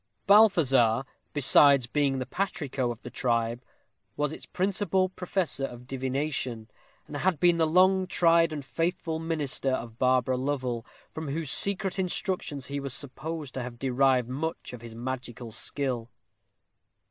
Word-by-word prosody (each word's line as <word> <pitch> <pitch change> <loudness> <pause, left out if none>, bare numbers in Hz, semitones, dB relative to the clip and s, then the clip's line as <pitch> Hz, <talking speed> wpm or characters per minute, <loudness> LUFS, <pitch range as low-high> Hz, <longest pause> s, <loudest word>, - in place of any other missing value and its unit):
Balthazar, 140 - +5 0.3
besides 140 -1 +5
being 135 +1 0
the 130 - -3
patrico 145 -10 -2
of 120 0 -7
the - - -8
tribe, 115 -1 0 0.6
was 150 0 0
its - - -10
principal 190 0 0
professor 180 -6 -2
of 125 -2 -9
divination, 130 -3 -3 0.3
and 145 - -7
had 175 0 0
been 175 +1 +4
the 160 -1 +3
long 185 +3 +4
tried 165 -2 +4
and 145 -3 -5
faithful 165 +1 -2
minister 155 -5 -1
of 120 -3 -4
Barbara 130 0 +2
Lovel, 130 -3 -2 0.2
from 160 -1 -6
whose 150 0 -2
secret 195 -1 +3
instructions 180 -6 -2
he 140 +1 -4
was 135 -2 -4
supposed 145 +1 -5
to 130 - -4
have 120 -1 -7
derived 130 -1 +2
much 150 +3 -4
of 120 - -9
his 115 -1 -10
magical 120 -1 -6
skill. 120 0 -3
140 Hz, 145 wpm, -28 LUFS, 125-165 Hz, 0.6 s, Balthazar